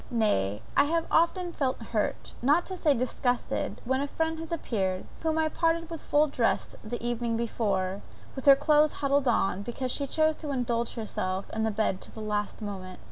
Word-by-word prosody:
Nay, 110 - +1
I 280 - +6
have 330 +2 +1
often 345 +1 +2
felt 260 -3 -1
hurt, 225 -2 -2
not 295 +8 +3
to 375 - -5
say 305 -5 +3
disgusted, 250 0 -1
when 265 +2 +1
a 285 - -1
friend 320 +2 -1
has 325 +1 -7
appeared, 190 - -1 0.2
whom 320 -1 0
I 315 0 +3
parted 330 +1 0
with 330 - -5
full 295 +1 +3
dressed 255 -6 0
the 240 +2 -4
evening 235 -1 -1
before, 200 -4 -1 0.3
with 265 +1 -6
her 275 - +10
clothes 300 +1 +4
huddled 280 -1 +1
on, 195 -5 +2
because 245 +4 -3
she 280 +1 -1
chose 315 +2 +2
to 300 - -6
indulge 240 -3 -1
herself 190 -4 -3
in 220 0 0
bed 205 -3 0
till - - -11
the - - -7
last 210 +1 -2
moment. 185 -3 -6
250 Hz, 190 wpm, -28 LUFS, 215-305 Hz, 0.3 s, her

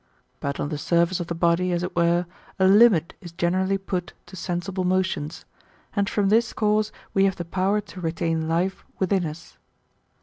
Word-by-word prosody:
But 140 0 -3
on 145 - -2
the 150 -2 -4
surface 170 +3 +2
of 175 - -4
the 170 - -3
body, 170 +2 +2
as 175 0 0
it 180 - -4
were, 170 +1 +2 0.3
a 190 - +3
limit 195 -4 +5
is 175 - -9
generally 185 +2 +1
put 185 -2 -4
to - - -12
sensible 185 +1 -3
motions; 180 -4 -1 0.5
and 200 -1 +1
from 200 -2 +1
this 225 +2 +3
cause 210 0 +1 0.2
we 195 0 +4
have 190 -1 +1
the 175 - -5
power 190 +4 +1
to 195 -2 -11
retain 165 -1 -1
life 175 +4 -1
within 190 -2 +1
us. 155 +3 -10
180 Hz, 180 wpm, -24 LUFS, 170-195 Hz, 0.5 s, limit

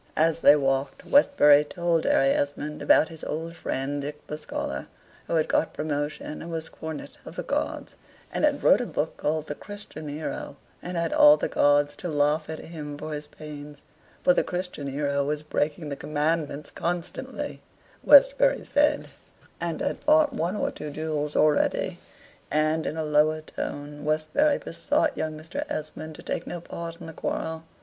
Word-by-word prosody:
As 160 +1 +3
they 145 - +8
walked, 135 -1 -1
Westbury 150 - +6
told 170 +1 0
Harry 135 - +4
Esmond 145 +2 -1
about - - +5
his 160 -2 -11
old 165 +2 -4
friend 140 -2 -2
Dick 150 +1 -7
the 150 - -5
Scholar, 150 - -4 0.4
who - - -1
had 155 -1 +2
got 160 - +1
promotion, 150 0 -3
and 170 - -7
was 165 -1 -4
Cornet 160 -2 -8
of - - -10
the - - -3
Guards, - - -2 0.4
and - - -1
had - - +2
wrote - - +6
a - - -3
book - - -2
called 155 0 -1
the 145 - -4
"Christian 200 -4 -9
Hero," 145 -1 -5 0.3
and 180 0 -4
had 170 -1 0
all 150 +1 +8
the - - -1
Guards 145 0 +3
to 180 - -4
laugh 150 +1 +1
at 160 - -4
him 150 -3 -7
for 155 +1 -5
his 150 0 -5
pains, 150 -1 -10 0.4
for 180 - +6
the - - +2
Christian 180 -5 -4
Hero 140 0 0
was 150 +1 -2
breaking 150 +1 -1
the 140 - -3
commandments 150 0 -1
constantly, 175 0 -4 0.4
Westbury - - +6
said, 295 0 +2 0.5
and - - -3
had - - -1
fought 300 -2 +4
one 180 -4 -1
or - - -1
two 150 - -7
duels 150 0 -3
already. 150 -1 +2 0.5
And, 155 +1 +1
in 155 - -3
a 160 - -1
lower 155 +1 +3
tone, 145 -1 -6
Westbury 155 - +2
besought 305 - 0
young 155 -1 -3
Mr. 155 +2 -5
Esmond 155 +1 -5
to - - -11
take - - -3
no 175 - -4
part 170 0 -7
in 170 - -9
the 165 - -8
quarrel. 160 +1 -3
155 Hz, 175 wpm, -26 LUFS, 150-165 Hz, 0.5 s, they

